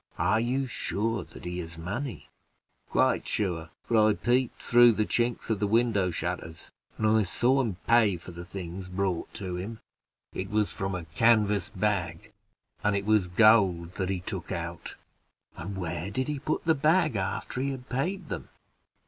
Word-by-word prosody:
"Are 110 - +2
you 130 +4 0
sure 115 -3 -2
that - - -13
he 90 0 -3
has 80 -1 -7
money?" 110 +10 -5 0.6
"Quite - - +2
sure; 85 -5 -1
for 115 - +1
I - - +4
peeped 125 0 0
through 120 0 +6
the 110 0 +1
chinks 120 0 -1
of 105 - 0
the 105 - +1
window 110 -4 +2
shutters, 80 -1 -5 0.3
and 110 - -1
I 110 0 +4
saw 125 +7 +2
him 110 -8 -2
pay 115 -5 +4
for 90 - -11
the 85 0 -8
things 90 0 -7
brought 90 -2 -2
to 95 -5 -4
him; 110 +5 -6 0.5
it 95 +1 -4
was 105 -1 +1
from 95 -1 -3
a 90 -2 -5
canvas 105 +5 +3
bag, 100 -2 -2 0.5
and 105 -1 +2
it 100 0 -1
was 105 -3 +3
gold 90 -3 +4
that 95 0 -2
he 95 -2 -1
took - - -6
out." - - -5 0.6
"And 95 +4 -6
where 85 0 -3
did 130 +6 -2
he 150 -2 -2
put 155 +2 -2
the 160 - +5
bag 155 -1 +2
after 100 +5 -2
he 140 - 0
had 130 -2 -6
paid 175 +10 -2
them?" - - -6
105 Hz, 175 wpm, -28 LUFS, 90-120 Hz, 0.6 s, through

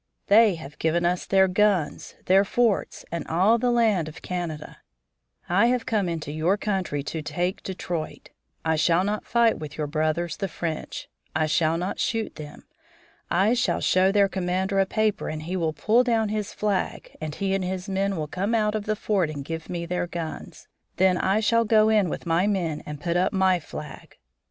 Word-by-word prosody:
They 210 -1 +6
have 150 -2 -11
given 170 +2 +1
us 180 +1 0
their 190 -1 +4
guns, 190 -4 0
their 190 +2 +5
forts, 225 0 0
and 170 - -3
all 195 +8 +3
the 250 +1 +1
land 220 -9 +2
of 155 - -10
Canada. 170 -4 -5 0.7
I 195 +6 +4
have 245 -1 0
come 210 -7 0
into 160 -3 -4
your 160 +6 +1
country 185 -9 -2
to 160 +2 -4
take 175 +5 -2
Detroit. 175 -4 -5 0.3
I 160 0 +2
shall 170 +3 +3
not 210 +2 -2
fight 235 -1 +3
with 150 -2 -8
your 155 - -1
brothers, 155 +3 -1
the 195 - -2
French; 165 -2 -5 0.3
I 155 +1 +2
shall 155 +1 +1
not 180 +3 -3
shoot 225 -1 -1
them. 150 -2 -10 0.7
I 195 +6 +3
shall 245 - +1
show 185 +1 +3
their 200 -1 +4
commander 190 +1 -1
a 195 - +3
paper 215 +1 0
and 155 0 -5
he 175 +4 -4
will 165 -3 0
pull 220 +10 +3
down 225 -3 +1
his 210 -1 -3
flag 205 -3 -2
and 155 -1 -4
he 195 -1 -1
and 195 -1 0
his 185 +1 -4
men 195 0 0
will 155 - -2
come 200 +9 -1
out 210 -1 +1
of 215 -1 -3
the 215 - 0
fort 200 -5 0
and 145 -3 -6
give 160 +1 -6
me 170 -1 -3
their 180 0 -2
guns. 170 -2 -7 0.3
Then 185 0 +4
I 195 +4 +1
shall 230 +1 +3
go 215 -1 +4
in 210 -5 +3
with - - -5
my 170 +3 +2
men 175 -7 -1
and 150 -1 -6
put 170 +2 -1
up 180 - +1
my 190 -2 +3
flag. 155 - -10
185 Hz, 195 wpm, -25 LUFS, 165-210 Hz, 0.7 s, They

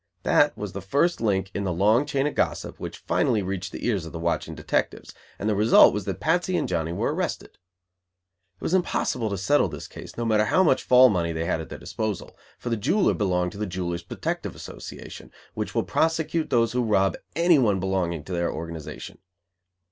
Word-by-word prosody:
That - - +3
was 105 -3 -5
the 100 - -5
first 140 - +1
link 95 -3 0
in 100 - -2
the 95 - -1
long 105 - +3
chain 140 -1 0
of 150 - -1
gossip - - -2
which - - -6
finally 105 - +1
reached 95 -1 -4
the - - -6
ears 105 -8 0
of 80 - -8
the - - -6
watching 85 +1 -2
detectives; - - -2 0.2
and 105 - -3
the 110 - +2
result 105 +3 +6
was 105 -1 -3
that 95 -2 -4
Patsy 175 +2 +1
and - - -1
Johnny 85 -2 -1
were 85 - -1
arrested. - - -4 1.0
It - - -38
was - - -2
impossible 130 -10 0
to 100 - -3
"settle" 145 +11 +3
this - - -8
case, - - -11
no 120 - -2
matter 110 -1 +3
how 185 - +3
much 140 -7 +3
"fall 125 0 +7
money" 85 -5 0
they 80 +1 -2
had 85 -1 -1
at 80 - -9
their - - -7
disposal; 110 -4 -4 0.2
for 120 - -5
the 115 - +1
jeweler 190 - +2
belonged 90 -4 0
to 100 - -10
the 105 - -2
Jewelers' 85 -1 -3
Protective 85 - -4
Association, - - -9 0.2
which - - -4
will - - +2
prosecute 160 0 0
those 115 -3 +2
who 125 - 0
rob 95 -4 +2 0.2
anyone 145 - +4
belonging 90 -4 -1
to 90 - -7
their 85 -1 0
organization. 80 -1 -7
100 Hz, 205 wpm, -25 LUFS, 90-125 Hz, 1.0 s, fall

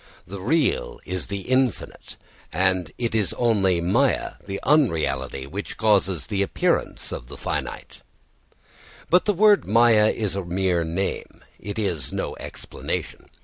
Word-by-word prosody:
The 100 +1 -8
real 145 - 0
is 90 0 -2
the 100 -1 -4
infinite, 130 -1 -1 0.4
and 95 -1 +1
it 120 -2 -2
is 105 -4 0
only 100 -7 +2
māyā, 120 +11 +1
the 100 0 -5
unreality, 105 - +1
which 95 +9 -6
causes 95 -8 +2
the 100 -1 -1
appearance 100 - -1
of - - -6
the - - -10
finite. - - -5 1.1
But 180 +1 +5
the 210 - +2
word 205 +2 +5
māyā 110 -1 +5
is 105 -4 -2
a 100 - -2
mere 90 -1 0
name, 85 +4 -4 0.2
it 100 +2 -6
is 85 - -1
no - - -3
explanation. - - -6
100 Hz, 140 wpm, -24 LUFS, 90-120 Hz, 1.1 s, But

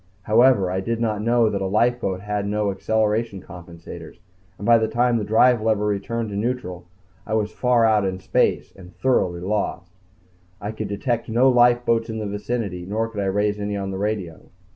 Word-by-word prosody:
However, 110 -4 +4
I 95 - -1
did 115 +4 -2
not 110 -3 -1
know 115 +1 +3
that 100 - -2
a 95 - -1
lifeboat 105 -2 0
had 105 0 -3
no 105 0 0
acceleration 110 +1 -1
compensators, 85 -2 -11 0.4
and 100 - -7
by 115 0 +6
the 110 - 0
time 120 +1 +1
the - - -3
drive 115 +3 +4
lever 110 -1 +1
returned 105 +2 -2
to - - -5
neutral, 100 -6 -3 0.4
I 110 - -3
was 105 -1 0
far 125 -2 +2
out 110 -2 +3
in 95 -1 -2
space 95 - 0
and 90 -2 -15
thoroughly 90 -6 +1
lost. 95 -2 -3 0.7
I 105 - -4
could 110 -1 -5
detect 115 +4 -2
no 120 +4 +4
lifeboats 120 -2 +3
in 110 - -4
the 110 - -4
vicinity 100 -2 -4
nor 110 +5 -2
could 105 -3 -5
I - - -1
raise 105 +2 0
any 105 0 -3
on 95 -1 -4
the 95 - -5
radio. 100 -6 -4
105 Hz, 190 wpm, -22 LUFS, 100-115 Hz, 0.7 s, by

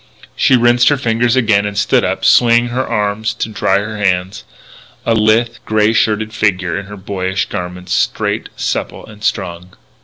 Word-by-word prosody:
She 130 - +3
rinsed 120 0 +4
her 145 - +2
fingers 120 -1 +1
again 110 -5 +2
and 105 0 -4
stood - - +2
up, - - -2
swinging 120 0 +4
her 125 +2 -2
arms 105 +1 -1
to 110 - -3
dry 100 -2 +1
her 105 +2 -4
hands, 95 0 -1 0.6
a 115 - +2
lithe, 115 +2 +2
grey 110 0 +1
shirted 110 -1 0
figure 95 -6 0
in 100 +2 -5
her 105 0 -9
boyish 95 0 -3
garments, 90 0 -5
straight, - - -1
supple, - - -3
and 105 -1 -14
strong. 90 -2 -3
105 Hz, 165 wpm, -15 LUFS, 95-115 Hz, 0.6 s, rinsed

